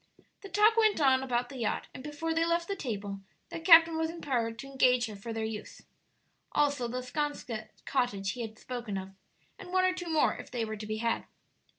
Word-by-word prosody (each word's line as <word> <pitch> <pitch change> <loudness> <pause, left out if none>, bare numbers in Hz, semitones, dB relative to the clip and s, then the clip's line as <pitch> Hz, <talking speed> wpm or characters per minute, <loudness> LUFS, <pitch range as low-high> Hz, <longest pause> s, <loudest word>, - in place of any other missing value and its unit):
The 395 - -9
talk 430 +3 +4
went 435 -4 +4
on 265 -3 +4
about 245 -2 -1
the 270 - -8
yacht, 225 - -1
and 255 - -9
before 310 +3 -3
they 330 0 +2
left 340 0 +1
the 395 - -2
table 205 - -4 0.3
the - - -5
captain 330 -1 +7
was 320 0 0
empowered 250 -9 -2
to 240 - -7
engage 255 -2 +3
her 215 -2 -7
for 200 +4 -7
their 225 0 -2
use. 220 -1 -7 0.7
Also 285 -4 +2
the 250 +2 -4
'Sconset 250 -5 -3 0.2
cottage 205 -7 0
he 245 - -6
had 220 -1 -6
spoken 240 -5 -5
of, 190 0 -6 0.5
and 375 -2 -9
one 370 0 +3
or 370 - +3
two 355 -2 -6
more, 315 -2 +3
if - - -9
they 240 -2 -2
were 220 0 -4
to 210 0 -7
be 215 0 -2
had. 230 +1 -1
255 Hz, 215 wpm, -30 LUFS, 225-325 Hz, 0.7 s, captain